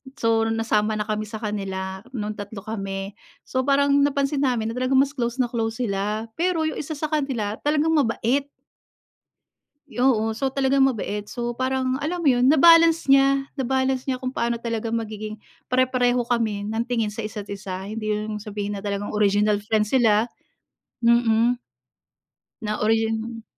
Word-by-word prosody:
so 225 -3 +1
nasama 220 -1 +1
na 210 - -1
kami 215 0 -3
sa 220 - -8
kanila, 190 -2 -4 0.2
nung 210 -2 -2
3 205 -1 -8
kami. 195 -2 -4 0.3
So 260 +1 -2
parang, 280 0 +4
napansin 280 0 +1
namin 245 -5 0
na 245 - -4
talagang 255 +1 +1
mas 270 +1 +4
close 240 -5 -2
na 250 -3 0
close 225 -1 -1
sila, 210 +1 -2
pero 345 -2 +1
yung 315 -1 -2
1 310 +2 -5
sa 305 +1 -4
kanila 255 -9 -1
talagang 305 +2 +2
mabait. 275 -1 +1 1.4
Oo, 245 -5 +1
so 270 +1 -1
talagang 270 0 +3
mabait, 210 -5 -2
so, 240 -1 -4
parang 260 0 0
alam 350 +4 -2
mo 320 - +1
yun, 250 -1 +3
na-balance 330 +1 +6
niya, 275 0 +4
na-balance 265 0 0
niya 260 -2 -2
kung 255 - -2
paano 235 0 0
talaga 230 -1 -3
magiging, 215 -1 -4 0.3
pare-pareho 250 -1 +2
kami 225 -4 0
ng 225 +2 -1
tingin 235 -4 -1
sa 215 +2 -6
isa't 210 -1 -6
isa. 190 -1 -6
Hindi 215 0 -3
yun 210 +1 -3
ibig 210 - -9
sabihin 205 -1 -4
na 195 - -8
talagang 200 0 -2
original 210 0 +3
friend 210 0 +1
sila, 225 -3 +3 0.8
mm. 235 0 +3 1.0
Na 215 -1 -3
origin 225 +1 0
230 Hz, 160 wpm, -23 LUFS, 215-265 Hz, 1.4 s, na-balance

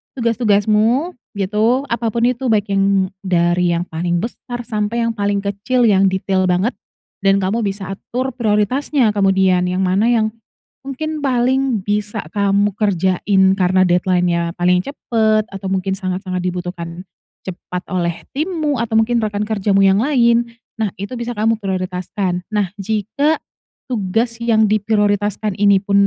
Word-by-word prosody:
tugas-tugasmu 230 - +2 0.2
gitu, 215 +6 +1
apa 235 0 -1
pun 230 +1 -1
itu 250 +1 +1
baik 210 -3 +1
yang 195 -1 +2
dari 175 -2 +1
yang 170 - -1
paling 175 +2 -2
besar 240 +1 -6
sampai 225 0 -2
yang 230 - +1
paling 200 -2 -1
kecil 205 +6 0
yang 195 -4 +4
detail 190 0 0
banget 180 +6 +1 0.5
dan 195 -1 +2
kamu 200 +5 0
bisa 195 -3 -3
atur 255 +6 -4
prioritasnya 235 +2 +1
kemudian 190 -3 +2
yang 185 +1 0
mana 190 +4 +2
yang 220 -2 +2 0.6
mungkin 310 +3 -4
paling 260 -4 +1
bisa 210 +1 -2
kamu 200 0 +2
kerjain 190 -1 +1 0.2
karena 185 0 +3
deadline-nya 175 -1 +1
paling 180 0 +2
cepat 220 -2 0
atau 195 -1 -6
mungkin 190 0 -1
sangat-sangat 185 0 -3
dibutuhkan 180 -1 -5 0.4
cepat 180 0 -6
oleh 170 -2 -2
timmu 305 -3 -1
atau 230 -1 -2
mungkin 230 +2 +3
rekan 210 -2 -1
kerjamu 200 -2 +1
yang 195 +1 +4
lain. 235 -3 +3 0.3
Nah 210 -4 -1
itu 200 +5 -7
bisa 240 0 -4
kamu 220 +1 +1
prioritaskan, 185 -1 -2
nah, 210 -4 -1
jika 220 +9 0 0.5
tugas 230 0 -1
yang 230 -2 +2
diprioritaskan 210 0 +1
ini 200 -1 +5
pun 200 0 -3
205 Hz, 140 wpm, -18 LUFS, 185-230 Hz, 0.6 s, ini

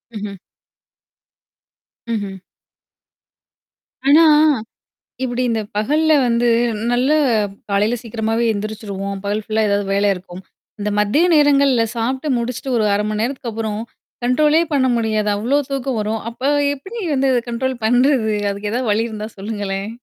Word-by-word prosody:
ம்ஹ்ம். 205 -1 -6 1.8
ம்ஹ்ம். 200 -3 -3 1.7
ஆனா 300 +4 +7 1.0
இப்படி 245 -1 -1
இந்த 225 -1 0
பகல்ல 300 +9 +2
வந்து 235 0 +2 0.4
நல்லா 255 +5 +2 0.5
காலையில 205 +4 +1
சீக்கிரமாவே 225 0 -1
எந்திரிச்சுருவோம். 200 -2 -5
பகல் 205 +2 -2
ஃபுல்லா 220 0 0
ஏதாவது 200 0 0
வேலா 200 +1 +2
இருக்கும். 180 0 -10 0.4
இந்த 205 +1 -1
மதிய 210 +12 +3
நேரங்கள்ல 280 -4 +4
சாப்ட்டு 260 +6 -2
முடிச்சுட்டு 250 +2 -3
ஒரு 215 - +2
1/2 205 +1 +1
மணி 215 0 -2
நேரத்துக்கு 245 -1 -3
அப்புறம் 215 -1 -3 0.4
கண்ட்ரோலே 300 +6 +3
பண்ண 265 -2 +3
முடியாது. 215 -2 0
அவ்வளோ 240 +7 +1
தூக்கம் 265 -4 -2
வரும். 215 +1 -2
அப்ப 235 +2 -16 0.3
எப்படி 380 - -9
வந்து 270 0 +2 0.2
கண்ட்ரோல் 255 +2 -2
பண்றது? 245 -1 +3 0.2
அதுக்கு 200 +1 -4
எ - - -4
ஏதாவது 245 -1 -1
வழி 225 +3 +1
இருந்தா 215 -1 -5
சொல்லுங்களேன்? 200 -1 -4
225 Hz, 130 wpm, -19 LUFS, 210-260 Hz, 1.8 s, ஆனா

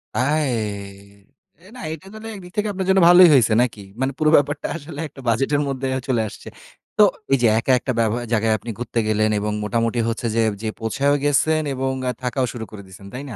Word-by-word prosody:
আয় 145 +2 +1 1.2
এ - - -15
না 250 - -10
এটা 160 - -11
তাইলে 220 +1 -9
একদিক 180 -2 -11
থেকে 210 0 +1
আপনার 190 -1 -4
জন্য 190 0 +5
ভালোই 175 -1 +9
হইছে 115 -5 +4
নাকি? 115 -4 -2 0.2
মানে 130 - +1
পুরো 155 -1 +2
ব্যাপারটা 145 0 +1
আসলে 150 -2 -8
একটা 135 - -14
বাজেটের 135 +6 +1
মধ্যে 135 -1 -3
অ্যা 130 0 -2
চলে 120 -4 +1
আসছে। - - -13 0.5
তো 210 - +7 0.3
এই 135 - +5
যে 120 - +5
একা 130 - 0
একটা 130 - -3
বেবয়া 115 +2 +1
জায়গায় 110 0 +2
আপনি 120 - -10
ঘুরতে 120 -1 -2
গেলেন 110 0 +2
এবং 105 +1 -2
মোটামুটি 115 +2 0
হচ্ছে 115 +1 -4 0.4
যে 110 - -3
পৌঁছায়ও 140 +6 +1
গেছেন 155 +2 +2
এবং 130 0 -1 0.2
আ - - +1
থাকাও 125 +1 0
শুরু 115 -3 -6
করে 105 -2 -9
দিয়েছেন। 95 +1 -13
তাই 135 +3 -6
না? 115 - -7
130 Hz, 205 wpm, -21 LUFS, 115-150 Hz, 1.2 s, ভালোই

